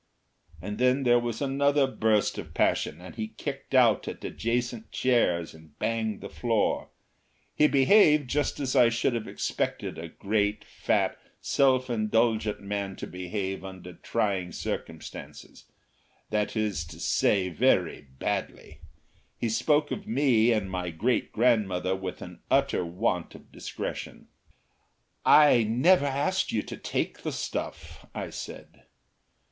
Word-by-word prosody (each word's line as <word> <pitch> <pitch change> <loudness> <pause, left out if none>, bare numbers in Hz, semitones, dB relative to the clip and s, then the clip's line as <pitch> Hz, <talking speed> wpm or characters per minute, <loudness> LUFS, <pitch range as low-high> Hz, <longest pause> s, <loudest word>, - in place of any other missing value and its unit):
And 105 +3 -5
then 125 +2 +3
there 120 -1 +5
was 120 +2 -3
another 140 +1 +2
burst 110 -5 +1
of - - -9
passion, - - +1
and 90 +1 -10
he 110 -2 -4
kicked 140 -1 -5
out 120 -4 +4
at - - -6
adjacent 120 -1 -2
chairs 90 -10 +1
and 80 -2 -17
banged 110 -2 -2
the - - -6
floor. 115 -3 0 0.6
He 150 - +4
behaved 150 0 +5
just 145 +3 -1
as 135 -1 -1
I 125 -3 +6
should 120 +2 0
have 115 -2 -3
expected - - -3
a 85 0 -7
great, 105 +3 -1
fat, - - 0 0.2
self 130 -2 +2
indulgent 110 -1 +1
man 100 -1 -3
to - - -6
behave 95 +2 -4
under 95 -2 -9
trying 95 -2 -1
circumstances - - -7 0.7
that 105 +1 0
is 105 -7 -1
to 80 0 -12
say, 95 +2 +2
very 90 - +1
badly. - - -4 0.6
He 115 - -1
spoke 145 +7 +2
of 205 - -5
me 125 - +3
and 105 -4 0
my 90 -1 -3
great 110 +10 0
grandmother 100 -6 +2
with 95 -1 -6
an 90 -1 -11
utter 135 -8 +2
want 90 0 -2
of - - -15
discretion. - - -6 1.0
"I 150 -5 +7
never 140 +9 +3
asked 145 +8 0
you 110 - 0
to - - -7
take - - -3
the - - -3
stuff," - - -5
I - - -4
said. - - -9
110 Hz, 140 wpm, -27 LUFS, 95-130 Hz, 1.0 s, I